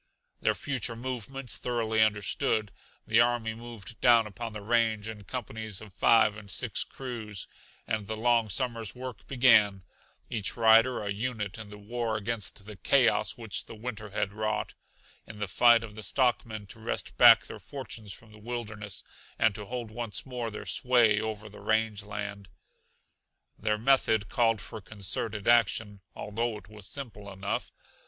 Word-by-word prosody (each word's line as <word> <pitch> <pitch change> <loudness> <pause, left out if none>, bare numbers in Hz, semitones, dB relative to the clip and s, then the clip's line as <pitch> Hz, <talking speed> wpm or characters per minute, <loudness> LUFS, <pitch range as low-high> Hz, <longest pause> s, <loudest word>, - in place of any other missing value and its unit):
Their - - +2
future 130 -4 -1
movements 130 +1 -4
thoroughly 115 -3 0
understood, 105 0 +1 0.3
the - - +4
army 120 -2 +1
moved 115 -2 -10
down 120 -2 +6
upon 115 +2 -6
the 105 -1 -7
range 110 -1 +2
in 105 -2 -7
companies 110 -5 -5
of 105 -3 -12
five 110 +1 +5
and 105 -2 -11
six - - -1
crews, 115 -7 -6 0.4
and 110 -2 -2
the 110 0 -3
long 115 -1 +3
summer's 115 -1 -2
work 125 -3 -8
began; 110 -7 +5 0.4
each 105 -2 -2
rider 115 +1 +5
a 100 - -2
unit 110 -1 -3
in 105 -2 -8
the 105 - -10
war 115 +1 -2
against 105 -2 -3
the 105 -1 -10
chaos 110 0 +3
which 115 -3 -3
the - - -9
winter 110 -2 -6
had 100 -1 -2
wrought; 110 0 -2 0.5
in 110 - -10
the 105 -1 -2
fight 115 +5 +5
of 110 -2 -8
the 110 - -8
stockmen 110 -1 0
to 95 - -11
wrest - - -4
back - - +9
their - - -9
fortunes 115 -7 -7
from 110 +3 -11
the 105 - -14
wilderness, 105 -3 -5 0.3
and 110 -2 +3
to 105 +1 -7
hold 120 0 -5
once 115 -1 -4
more 125 -3 -4
their 105 - -7
sway 120 -4 +4
over 110 -1 -4
the 105 - -12
range 110 -1 +1
land. 100 -1 -6 1.1
Their 105 0 0
method 110 -3 +3
called 115 -3 +2
for 110 - -8
concerted 100 +1 -2
action, 110 -3 +3
although 115 +2 -2
it 100 -2 -14
was 105 -2 -7
simple 105 -8 -5
enough. 95 +1 -3
110 Hz, 160 wpm, -29 LUFS, 105-120 Hz, 1.1 s, back